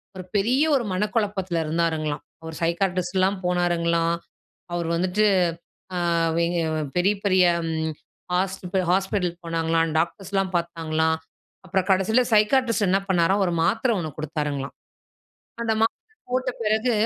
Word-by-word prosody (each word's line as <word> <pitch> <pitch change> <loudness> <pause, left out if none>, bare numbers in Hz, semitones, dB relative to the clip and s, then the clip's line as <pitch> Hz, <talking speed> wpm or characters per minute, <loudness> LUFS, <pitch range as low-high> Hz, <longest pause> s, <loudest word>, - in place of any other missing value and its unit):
ஒரு 185 - -6
பெரிய 240 +8 +3
ஒரு 250 -4 0
மனக்குழப்பத்ல 200 -3 -1
இருந்தாருங்களாம். 155 -2 -1 0.2
அவரு 160 0 -8
சைக்காட்ரிஸ்ட்லாம் 185 +2 +1
போனாருங்களாம், 170 -1 +1 0.6
அவரு 170 -1 -1
வந்துட்டு 185 +5 +1 0.7
அ - - 0 0.5
எங்க 170 0 0 0.4
பெரிய 190 +4 +3
பெரிய 185 -2 +4 0.9
ஹாஸ்பி 190 0 -1
ஹாஸ்பிட்டல் 190 -2 0
போனாங்களாம், 165 0 +1
டாக்டர்ஸ்லாம் 190 +3 -1
பார்த்தாங்களாம். 160 -1 0 0.5
அப்புறம் 190 0 0
கடைசியில 195 +6 +4
சைக்காட்ரிஸ்ட் 225 0 +3
என்ன 190 +2 +4
பண்ணாராம் 190 +2 +3
ஒரு 175 - -1
மாத்திர 225 +9 +2
ஒண்ணு 165 -3 -3
கொடுத்தாருங்களாம். 150 -3 -3 0.9
அந்த 225 - +1
மாத்திர 440 - -2 0.2
போட்ட 255 0 +1
பெறகு 220 +3 +1
180 Hz, 115 wpm, -24 LUFS, 170-205 Hz, 0.9 s, பெரிய